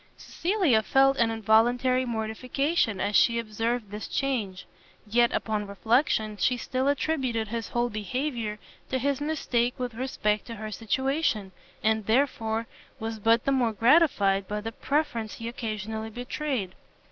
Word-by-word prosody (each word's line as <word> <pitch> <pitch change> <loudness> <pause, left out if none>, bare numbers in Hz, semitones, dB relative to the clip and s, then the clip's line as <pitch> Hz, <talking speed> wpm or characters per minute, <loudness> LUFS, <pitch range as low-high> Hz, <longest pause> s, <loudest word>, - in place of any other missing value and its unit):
Cecilia 345 - +1
felt 270 +4 +3
an 230 -1 +3
involuntary 240 +4 +3
mortification 235 - -1
as 205 +2 -1
she 235 0 +5
observed 225 0 -2
this 210 +1 -5
change: 225 -9 -2 0.4
yet, 235 +3 +3
upon 210 -2 -2
reflection, 220 +1 +1
she 250 +6 +2
still 260 +2 -2
attributed 265 -6 0
his 230 0 -3
whole 240 0 0
behaviour 225 +1 -3 0.3
to 260 - 0
his 280 +2 -1
mistake 250 -5 0
with 250 -2 -3
respect 220 -4 -1
to 230 - -6
her 215 0 -6
situation, 230 - -1 0.3
and 220 -1 +1
therefore 225 -2 +1 0.3
was 225 0 -4
but 225 +2 +3
the 275 - +2
more 245 -4 +2
gratified 215 - +3
by 210 0 -2
the 225 +2 -5
preference 280 -5 -1
he 230 - -6
occasionally 220 -2 -4
betrayed. 245 -3 -3
230 Hz, 140 wpm, -27 LUFS, 215-260 Hz, 0.4 s, she